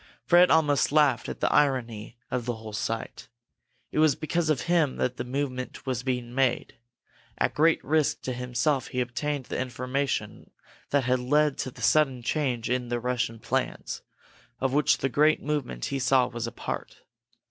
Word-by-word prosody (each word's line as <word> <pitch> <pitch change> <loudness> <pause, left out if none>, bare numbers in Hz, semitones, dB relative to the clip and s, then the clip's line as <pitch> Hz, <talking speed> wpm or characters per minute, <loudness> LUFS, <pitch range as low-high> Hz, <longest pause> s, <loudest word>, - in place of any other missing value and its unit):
Fred 180 +1 +6
almost 145 -4 +3
laughed 145 -6 +3
at - - -7
the - - +2
irony 120 -6 0
of 125 -1 -2
the 120 - -1
whole 110 -1 -9
sight. 115 +1 -4 0.6
It - - -1
was 155 -3 +5
because 160 +1 -1
of 155 - +2
him 170 -5 +2
that 125 -1 -1
this 120 - -4
movement 130 -1 -4
was 130 -3 -1
being 125 -2 -3
made. 130 -2 +1 0.6
At - - +1
great 160 +2 +3
risk 155 +1 +1
to 130 - -2
himself 125 +3 0
he - - -7
had 125 -1 0
obtained 145 +2 -3
the - - -4
information 130 +2 -3 0.4
that 140 -1 +2
had 125 +1 +1
led 145 +3 +2
to - - -2
the - - -11
sudden 135 -5 +3
change 125 -4 -1
in 125 0 -1
the 120 0 -1
Russian 120 -2 -1
plans, - - -3 0.6
of 130 0 0
which 145 0 +3
the 135 - 0
great 150 +4 +3
movement 140 - -2
he 135 - -2
saw 125 0 +4
was 120 -1 -4
a - - -5
part. - - -6
130 Hz, 180 wpm, -27 LUFS, 120-150 Hz, 0.6 s, Fred